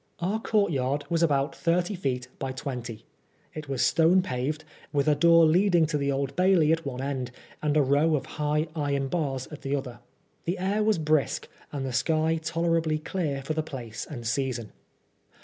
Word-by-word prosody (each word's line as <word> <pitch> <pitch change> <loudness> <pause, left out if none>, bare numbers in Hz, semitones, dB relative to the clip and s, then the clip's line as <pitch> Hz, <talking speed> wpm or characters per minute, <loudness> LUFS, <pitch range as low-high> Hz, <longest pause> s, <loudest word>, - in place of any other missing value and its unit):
Our 195 +6 -1
courtyard 150 - 0
was 165 -1 +2
about 145 -3 +2
thirty 175 +3 +1
feet" 130 -9 -2
by 135 -1 -3
twenty. 125 -4 -6 0.5
It 155 -2 -7
was 135 -2 +1
stone 170 +3 +4
paved, 150 -1 -2 0.3
with 140 0 +1
a 150 - +5
door 165 +2 +6
leading 175 +1 +4
to 150 -1 -1
the 140 0 0
Old 135 0 -2
Bailey 180 -4 +4
at 165 0 +1
one 130 -1 -4
end, 130 -3 -2 0.3
and 150 0 +1
a 150 - +5
row 145 +4 +3
of 135 -3 -2 0.2
high 150 +2 +1
iron 140 -3 -1
bars 135 -6 -2
at 150 - -9
the 140 +1 -1
other. 125 -4 -5 0.5
The 175 +3 -1
air 195 +3 0
was 215 -2 +3
brisk, 155 -2 +1 0.2
and 140 -2 -3
the 130 - -4
sky 160 +5 +1
tolerably 165 -1 +1
clear 155 -4 -3
for 155 - -2
the 155 - 0
place 125 -8 -7
and 120 -6 -7
season. 120 -2 -2
150 Hz, 185 wpm, -27 LUFS, 135-165 Hz, 0.5 s, door